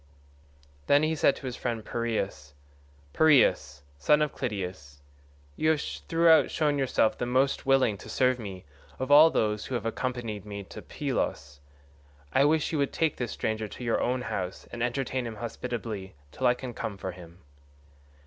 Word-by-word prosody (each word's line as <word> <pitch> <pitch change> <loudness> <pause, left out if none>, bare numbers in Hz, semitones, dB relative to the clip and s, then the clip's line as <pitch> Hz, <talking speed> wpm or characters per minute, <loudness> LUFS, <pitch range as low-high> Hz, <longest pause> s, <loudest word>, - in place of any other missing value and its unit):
Then 145 +1 +5
he 155 +1 +1
said 145 - +3
to - - -10
his 125 -2 -4
friend 115 -4 -3
Piraeus, 105 -11 -3 0.6
"Piraeus, 120 - +3 0.2
son 150 - +4
of 150 - -2
Clytius, 90 - -5 0.5
you 155 - +1
have 160 -1 +3
throughout 165 +2 +3
shown 150 -3 0
yourself 125 -4 +2
the 120 - -1
most 130 +2 +1
willing 130 -7 +3
to - - -11
serve 130 -1 +2
me 95 -5 -8 0.3
of 130 +2 -3
all 155 +3 +9
those 105 -7 -1
who 130 - -3
have 115 -2 -3
accompanied 115 -3 -3
me 100 -1 -7
to - - -10
Pylos; 75 +1 -3 0.7
I 135 - +5
wish 155 0 +2
you 155 - -1
would 140 - 0
take 160 -2 0
this 120 -3 -3
stranger 110 0 -2
to 125 - -9
your 115 -1 0
own 125 +1 0
house 90 -4 -4
and 120 - -6
entertain 125 0 -1
him 115 - -6
hospitably 115 -4 -5 0.2
till 130 - 0
I 125 - +4
can 125 -1 -7
come 105 -2 -5
for 95 - -5
him." 85 -1 -13
120 Hz, 170 wpm, -28 LUFS, 105-135 Hz, 0.7 s, all